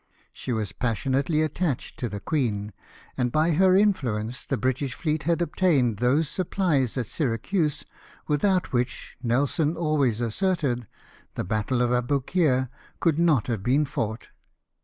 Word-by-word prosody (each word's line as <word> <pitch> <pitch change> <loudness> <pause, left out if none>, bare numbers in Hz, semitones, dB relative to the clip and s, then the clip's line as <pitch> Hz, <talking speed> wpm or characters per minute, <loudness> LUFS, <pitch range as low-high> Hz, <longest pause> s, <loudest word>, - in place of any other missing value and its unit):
She - - -5
was 110 -4 -1
passionately 135 - 0
attached 155 -2 -2
to 120 - -2
the 100 0 -5
queen; 105 -7 -1 0.4
and 125 -2 0
by 155 +4 +2
her 185 +3 +4
influence 125 - +1
the 135 - 0
British 130 +1 -1
fleet 155 -1 -1
had 170 +1 +2
obtained 145 - +2
those 135 +7 +2
supplies 160 - 0
at 125 - 0
Syracuse 150 - -1 0.4
without 180 +4 +1
which, 120 0 -2
Nelson 145 +6 +1
always 145 -8 +1
asserted, 125 - -1 0.5
the - - -2
battle 110 +5 0
of 120 - +1
Aboukir 130 +2 +1 0.3
could 165 -2 +2
not 160 -9 +3
have 115 -5 -2
been 135 +8 +2
fouofht. 115 -5 -4
135 Hz, 140 wpm, -25 LUFS, 120-160 Hz, 0.5 s, her